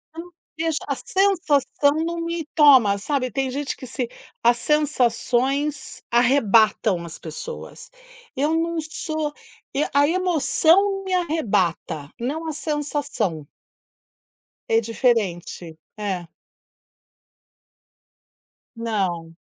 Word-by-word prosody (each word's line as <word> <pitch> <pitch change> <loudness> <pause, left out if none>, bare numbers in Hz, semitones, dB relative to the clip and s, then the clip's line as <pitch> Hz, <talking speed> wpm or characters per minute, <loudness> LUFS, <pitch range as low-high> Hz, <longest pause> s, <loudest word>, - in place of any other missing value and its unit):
Eu 330 - -5
não 355 +1 -14 0.3
vejo 320 -1 0
a 280 - -1
sensação 315 -6 +1
não 340 0 -3
me 335 -2 -3
toma 260 -10 +6
sabe. 255 +3 -2
Tem 265 +3 -1
gente 280 +1 -3
que 255 - -10
se 250 -1 -3 0.4
as 240 0 +5
sensações 275 0 0
arrebatam 225 -6 +3
as 165 - -8
pessoas. 170 - -8 0.5
Eu 295 +4 +1
não 335 0 -1
sou 310 -1 -4 0.4
e 285 - +1
a 285 +1 +5
emoção 335 -2 +3
não 390 -1 -1
me 375 -1 -3
arrebata, 195 - -1
não 300 +7 -3
a 315 - -1
sensação. 290 - -2 1.2
É 225 0 +4
diferente, 200 -8 -1 0.2
é. 190 -5 -3 2.5
Não. 190 -8 -2
275 Hz, 105 wpm, -23 LUFS, 220-315 Hz, 2.5 s, toma